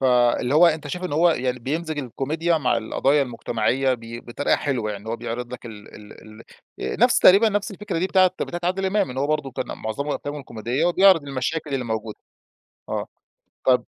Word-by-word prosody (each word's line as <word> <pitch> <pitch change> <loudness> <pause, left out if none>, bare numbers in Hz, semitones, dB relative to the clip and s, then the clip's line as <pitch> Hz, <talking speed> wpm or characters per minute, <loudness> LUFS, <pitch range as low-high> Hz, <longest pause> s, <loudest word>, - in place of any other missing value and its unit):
فاللي 125 0 +3
هو 170 +3 +7
أنت 160 -2 0
شايف 180 +4 -4
إن 180 - -3
هو 170 +4 +4
يعني 125 -4 -1
بيمزج 155 +5 -3
الكوميديا 155 +6 -1
مع 125 -4 +1
القضايا 135 +5 +1
المجتمعية، 125 +1 0
ب - - -11 0.3
بطريقة 120 +4 0
حلوة 125 -7 -2
يعني، 105 +1 -7
هو 115 - -2
بيعرض 120 +1 -5
لك 125 - -8
ال 105 -3 -11
ال 105 -1 -13 0.6
ال - - -4
نفس 245 +1 +5
تقريبًا 200 +5 +7
نفس 205 0 -1
الفكرة 200 -3 -4
دي 185 - +1
بتاعة 185 -1 +5
بتاعة 175 - -3
عادل 190 +2 0
إمام، 195 -4 +1
إن 130 - -6
هو 140 - +1
برضو 150 -3 -1
كان 125 - -4
معظمهم 140 +7 -3
أفلامهم 145 0 -5
كوميدية 120 +6 -2
وبيعرض 185 -1 +5
المشاكل 140 +2 -3
الموجودة، 110 -4 -3 0.7
آه. - - -2 0.6
طب 125 -2 +3
140 Hz, 185 wpm, -23 LUFS, 120-170 Hz, 0.7 s, هو